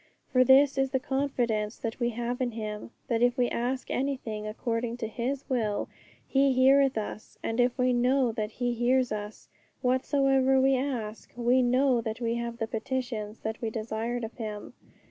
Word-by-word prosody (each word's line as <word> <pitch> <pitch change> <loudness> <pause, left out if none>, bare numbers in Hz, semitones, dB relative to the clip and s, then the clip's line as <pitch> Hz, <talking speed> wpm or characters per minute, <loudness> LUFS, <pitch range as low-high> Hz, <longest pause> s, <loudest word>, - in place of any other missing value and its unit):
For 255 -1 +5
this 270 +2 +5
is 270 0 +2
the 265 0 0
confidence 245 -6 -1
that 230 0 -5
we 240 -1 +1
have 240 +2 -3
in 245 -2 -1
Him, 215 -1 -5 0.2
that 230 -1 0
if 245 +1 +3
we 245 -1 +2
ask 255 +2 -2
anything 245 -6 -2
according 230 +2 -2
to 230 -2 -3
His 255 +5 -3
will, 225 -6 -1 0.4
He 270 0 +3
heareth 270 0 +4
us; 215 0 -6
and 225 +2 -2
if 245 +1 +2
we 250 -1 +2
know 250 +1 +2
that 215 -1 -4
He 245 -1 -1
hears 250 +2 +2
us, 210 0 -6 0.4
whatsoever 265 +1 +3
we 265 +1 +4
ask, 245 -5 -3
we 245 +2 +3
know 250 0 +3
that 220 0 -4
we 230 -1 0
have 235 0 -3
the 225 - -1
petitions 225 -2 -4
that 220 +1 -4
we 225 - -1
desired 225 +2 -3
of 225 - -5
Him. 210 -3 -6
245 Hz, 180 wpm, -28 LUFS, 225-260 Hz, 0.4 s, For